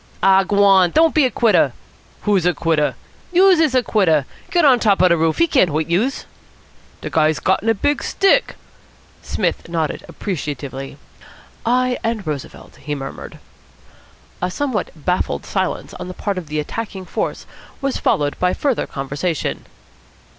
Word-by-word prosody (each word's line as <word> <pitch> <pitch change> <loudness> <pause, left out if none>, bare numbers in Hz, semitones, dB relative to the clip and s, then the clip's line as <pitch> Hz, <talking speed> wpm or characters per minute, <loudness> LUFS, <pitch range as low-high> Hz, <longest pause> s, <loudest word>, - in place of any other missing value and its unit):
"Aw 195 0 +5
g'wan! 195 -2 +4
Don't 320 - +3
be 305 -3 +4
a - - +2
quitter!" 235 -3 +3 0.5
"Who's 195 -5 +2
a 180 - +2
quitter?" 160 -3 0 0.4
"Youse 370 0 +5
is 310 -5 +2
a 255 - +3
quitter. 160 - +2 0.2
Get 345 -3 +3
on 260 -4 +6
top 205 -3 +3
de 180 -2 +4
roof. 160 -1 +1
He 335 - +4
can't 260 - +3
hoit 155 +2 -2
youse." 225 +11 0 0.8
"De - - -6
guy's 155 -1 +2
gotten 190 +4 +1
a 225 - +3
big 290 +8 0
stick." 395 +5 +2 0.7
Psmith - - -2
nodded 160 -3 -2
appreciatively. 140 - -5 0.7
"I 250 +1 +1
and 225 -3 -2
Roosevelt," 150 -3 -7
he 145 +1 -5
murmured. 135 -1 -8 1.0
A 180 - 0
somewhat 235 0 -2
baffled 180 +4 -2
silence 190 -2 -3
on 180 - -7
the 185 - -8
part 200 -3 -2
of 170 - -10
the 150 +1 -3
attacking 195 +3 -5
force - - -3 0.3
was 275 -1 -2
followed 145 -1 0
by 180 0 +1
further 275 -5 -1
conversation. 140 +4 -3
190 Hz, 155 wpm, -19 LUFS, 160-245 Hz, 1.0 s, on